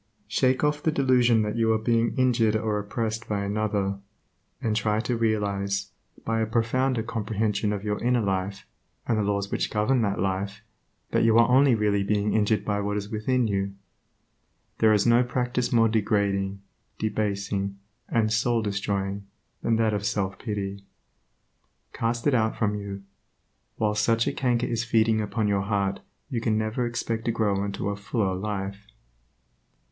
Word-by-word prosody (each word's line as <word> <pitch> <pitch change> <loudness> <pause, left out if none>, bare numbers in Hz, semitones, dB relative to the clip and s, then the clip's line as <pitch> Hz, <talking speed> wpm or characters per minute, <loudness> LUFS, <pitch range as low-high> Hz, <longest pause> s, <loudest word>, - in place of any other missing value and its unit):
Shake 130 +5 +1
off 150 0 +1
the 160 - +1
delusion 125 -5 +3
that 105 +1 -2
you 115 -1 +3
are - - +2
being 115 +1 +1
injured 120 -4 +3
or 110 -1 0
oppressed 110 +2 -3
by 100 -1 -1
another, 100 -1 -1 0.6
and 110 -2 -1
try 105 0 +1
to 120 +1 -1
realize, 100 -3 -1 0.3
by 115 0 0
a 110 - 0
profounder 115 +2 +1
comprehension 105 -1 -1
of 105 -1 -3
your 105 0 -2
inner 125 0 +2
life, 95 0 -2 0.4
and 115 - +2
the 110 - +1
laws 100 0 -1
which - - 0
govern 115 +4 +1
that 100 -2 0
life, 100 +2 -2 0.5
that - - +2
you 115 0 +5
are 115 - +6
only 130 0 +5
really 105 -2 +1
injured 105 +1 +1
by 105 -1 0
what 105 +1 -1
is 100 0 -4
within 120 +3 +1
you. 100 -1 -1 1.0
There 110 - +5
is 105 -1 +3
no 120 +1 +5
practice 125 0 -1
more 115 -1 +5
degrading, 100 -2 0 0.3
debasing, 100 -2 -2 0.3
and 110 -2 +1
soul 115 0 +1
destroying 100 -1 -2 0.3
than 115 - +1
that 110 -1 +2
of 100 -1 -2
self 100 -2 -1
pity. 100 -2 -4 1.1
Cast 115 +1 -2
it 145 - +3
out 110 -2 +2
from 105 -1 0
you. 100 -1 -6 0.7
While 105 -1 0
such 115 +2 +2
a - - -1
canker 125 -3 +1
is 115 -1 -1
feeding 110 -1 +2
upon 105 +1 -1
your 100 -1 +1
heart 100 -1 -1 0.3
you 125 -5 -3
can 110 -2 +1
never 110 +3 -1
expect 115 -1 -3
to 115 - +2
grow 105 -3 0
into 100 0 -3
a 100 - -2
fuller 100 -1 -1
life. 100 0 -4
110 Hz, 165 wpm, -26 LUFS, 100-115 Hz, 1.1 s, are